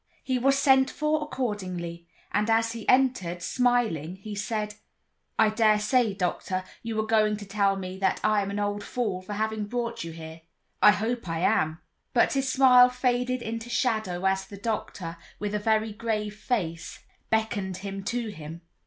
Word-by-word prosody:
He 255 -1 0
was 275 +2 +3
sent 265 -1 +5
for 305 0 0
accordingly, 185 - -4 0.2
and 210 +2 +1
as 225 0 +3
he 230 -2 -5
entered, 245 -10 +2
smiling, 230 - +1
he 205 +2 -8
said: 210 +1 -2 0.6
"I 220 - +5
dare 215 -1 +4
say, 215 -1 +2
doctor, 185 0 -2 0.2
you 225 -1 -3
are 215 - 0
going 215 -1 +2
to 205 - -8
tell 200 0 +1
me 190 -1 -6
that 190 -1 +1
I 215 -1 +3
am 195 - -3
an 200 - -3
old 205 0 -1
fool 210 -7 -2
for 185 +3 -7
having 220 0 -1
brought 235 -2 -3
you 165 - -6
here; 160 0 -9 0.4
I - - +9
hope 220 -1 0
I 165 0 -2
am." 155 -2 +1 0.3
But - - +4
his 270 -1 0
smile 250 -2 +7
faded 250 0 0
into 230 +1 -5
shadow 215 -7 0
as 190 0 +1
the 200 - -10
doctor, 195 -5 -4 0.2
with 205 0 -3
a 210 - 0
very 220 0 +1
grave 210 -1 -2
face, 180 -8 -3 0.3
beckoned 205 -4 0
him 195 0 -5
to 235 0 -2
him. 160 -3 -8
210 Hz, 175 wpm, -27 LUFS, 190-235 Hz, 0.6 s, I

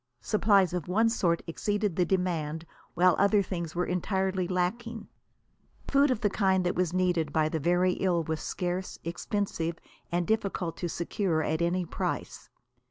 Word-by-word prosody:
Supplies 200 -4 +3
of 180 -5 -3
one 220 +5 +3
sort 175 -7 +1
exceeded 205 +2 -1
the 180 - +2
demand, 165 -4 -1 0.3
while 180 +1 +5
other 200 0 +4
things 170 -4 -5
were 180 +1 +1
entirely 190 0 -1
lacking. 215 +5 -2 0.8
Food 280 +1 +4
of 250 -3 0
the 210 - +2
kind 190 -3 +2
that 180 - +1
was 180 -2 0
needed 175 -4 +1
by 155 0 +2
the 160 - -2
very 175 +4 +2
ill 175 -3 +1
was 160 0 -3
scarce, 180 +1 -3
expensive 170 -1 -2 0.3
and 175 0 0
difficult 195 -5 -1
to 175 - -3
secure 170 -1 -1
at 160 +2 -1
any 175 +1 +1
price. - - -4
180 Hz, 160 wpm, -29 LUFS, 170-195 Hz, 0.8 s, while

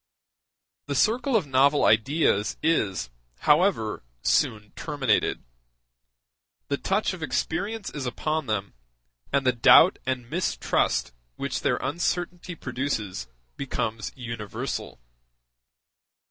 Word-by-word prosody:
The 140 - -2
circle 235 - +2
of 210 - +3
novel 140 +2 +3
ideas 110 -2 +2
is, 100 - +1 0.3
however, 150 - +2 0.2
soon 105 -1 +1
terminated; 140 -8 0 1.3
the 140 - 0
touch 195 +5 0
of 185 - -8
experience 200 - -2
is 140 -4 -4
upon 155 +4 -2
them, 100 -2 -2 0.6
and 140 -1 +1
the 130 - +5
doubt 125 +9 +7
and 130 -2 -2
mistrust 170 - 0 0.2
which - - -3
their - - +1
uncertainty 175 0 -2
produces 120 - -3 0.3
become 115 -5 -2 0.2
universal. 115 -5 -5
140 Hz, 100 wpm, -26 LUFS, 115-170 Hz, 1.3 s, doubt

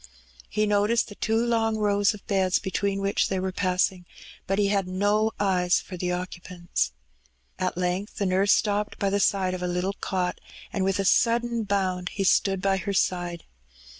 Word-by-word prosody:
He 215 - +1
noticed 210 +3 +2
the - - -8
two 220 +2 -1
long 225 -2 +1
rows 205 -1 +2
of 205 - -15
beds 190 -2 +2
between 195 0 -2
which 195 0 +1
they 190 - -1
were 190 0 -2
passings 185 -1 0 0.4
but 195 - 0
he 205 -1 +2
had 200 -2 +1
no 205 +4 +1
eyes 180 -3 +2
for 185 - -9
the 180 0 -2
occupants. 180 - -3 0.7
At 185 -1 -1
length 180 +3 -2
the 200 - -1
nurse 190 +2 +3
stopped 210 0 +1
by 200 -1 0
the 200 - +1
side 190 -2 +2
of 185 - -4
a 180 - -1
little 180 +2 -1
cot^ 180 -2 -2 0.3
and 195 - 0
with 195 0 +1
a 195 - -1
sudden 235 +2 +2
bound 185 -2 -1
he 200 - -3
stood 195 0 +2
by 195 -1 +2
her 195 +2 -3
side. 175 -2 -1
195 Hz, 185 wpm, -26 LUFS, 185-205 Hz, 0.7 s, nurse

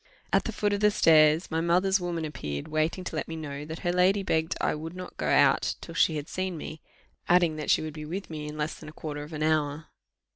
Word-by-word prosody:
At - - +3
the - - -2
foot 205 -1 0
of 200 - 0
the 210 0 +5
stairs 160 -3 +4
my 160 0 0
mother's 185 +3 +3
woman 175 -2 -3
appeared, 75 - -5
waiting 155 +4 -1
to 165 - -5
let 155 - -2
me 165 - -5
know 145 -2 -6
that 160 +2 -7
her 175 -1 0
lady 190 +3 +3
begged 160 -3 0
I - - +1
would 160 +3 -6
not 185 0 -8
go - - -3
out - - +4
till - - -9
she 160 - +3
had 150 0 -4
seen 185 -2 -3
me 155 0 -7 0.5
adding, 175 -3 +4
that 150 - -4
she - - +4
would 155 -1 -5
be 155 -1 -7
with 185 +6 -5
me 150 -2 -6
in 150 0 -7
less 150 +1 -2
than - - -10
a - - -12
quarter 150 -2 -6
of 150 +2 -9
an 155 -1 -3
hour. 155 -1 0
160 Hz, 255 wpm, -28 LUFS, 150-180 Hz, 0.5 s, the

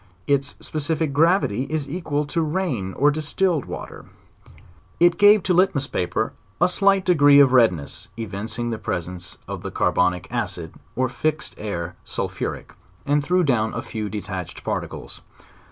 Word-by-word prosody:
Its 140 0 +1
specific 155 -1 -2
gravity 150 - +2
is 155 -3 -2
equal 150 -2 -2
to 165 +3 -1
rain 150 - -1
or 145 +2 +3
distilled 155 +2 0
water. - - -8 0.9
It 175 0 +4
gave 205 -1 +7
to 185 - +1
litmus 175 -6 +3
paper, 90 -8 -2 0.3
a - - +5
slight 195 +1 +3
degree 145 -5 +6
of 135 -2 +6
redness 90 - +2
evin 105 -2 -5
cing 120 +1 -3
the 110 - -3
presence 90 +1 -4
of - - -5
the - - -5
carbonic 90 -1 +1
acid, - - -3 0.2
or 130 +1 +1
fixed 155 +4 -2
air 85 -6 -4
sulphuric - - -4 0.3
and 145 0 +2
threw 180 +4 +2
down 115 -7 +1
a - - -3
few 110 -2 -4
detached 95 -4 -6
particles. - - -5
140 Hz, 150 wpm, -23 LUFS, 110-165 Hz, 0.9 s, gave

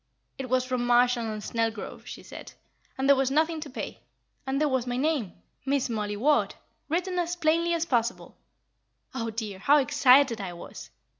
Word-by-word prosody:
It 260 -2 -5
was 255 0 +2
from 250 -1 -2
Marshall 245 -1 +3
& 215 -1 -4
Snelgrove, 225 0 -3
she - - -8
said, - - -10 0.4
and 265 +1 0
there 280 - +7
was 265 -1 +1
nothing 315 +3 +1
to 300 - -7
pay; 260 - -6 0.5
and 270 +1 0
there 305 - +2
was 260 -3 -1
my 245 0 -2
name, 275 - 0 0.3
'Miss 275 -1 0
Mollie 210 -2 -2
Ward,' 290 +7 +2 0.3
written 360 +3 -1
as 350 0 -1
plainly 335 +1 +2
as 335 0 -1
possible. 240 -5 -1 0.8
Oh, 230 -3 -3
dear, 215 -3 -5
how 285 +9 +5
excited 265 -3 +4
I 185 -3 -5
was? 170 - -10
260 Hz, 175 wpm, -27 LUFS, 230-300 Hz, 0.8 s, there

